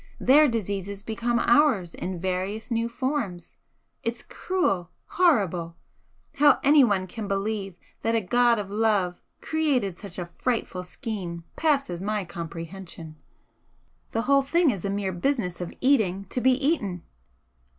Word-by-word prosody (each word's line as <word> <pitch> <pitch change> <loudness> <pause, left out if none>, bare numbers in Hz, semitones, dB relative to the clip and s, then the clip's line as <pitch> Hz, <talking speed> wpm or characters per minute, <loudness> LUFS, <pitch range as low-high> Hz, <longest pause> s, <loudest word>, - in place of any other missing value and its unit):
Their 295 +4 +6
diseases 200 -4 -3
become 235 +2 -1
ours 235 - +3
in 180 -1 -5
various 190 +5 -3
new 230 0 0
forms. 235 - -3 0.5
It's 230 +1 -3
cruel, 195 - -1 0.2
horrible! 190 - +1 0.6
How 290 0 +6
anyone 245 -10 +5
can 205 +3 -6
believe 195 -1 -2 0.3
that 225 0 +1
a - - +4
God 240 +4 +3
of 200 -2 -4
Love 205 -4 +1 0.2
created 280 - 0
such 195 -1 -6
a 175 - -3
frightful 185 0 -2
scheme 180 -4 -6
passes 275 - 0
my 210 0 -1
comprehension! 170 -1 -8 0.9
The 225 - -1
whole 275 +2 +4
thing 325 +2 +3
is 195 -6 -5
a 200 - -1
mere 200 -1 -1
business 180 -3 -1
of 175 - -4
eating 205 -8 +2
to 250 - -1
be 260 +1 +5
eaten!" 250 - 0
210 Hz, 135 wpm, -26 LUFS, 180-255 Hz, 0.9 s, Their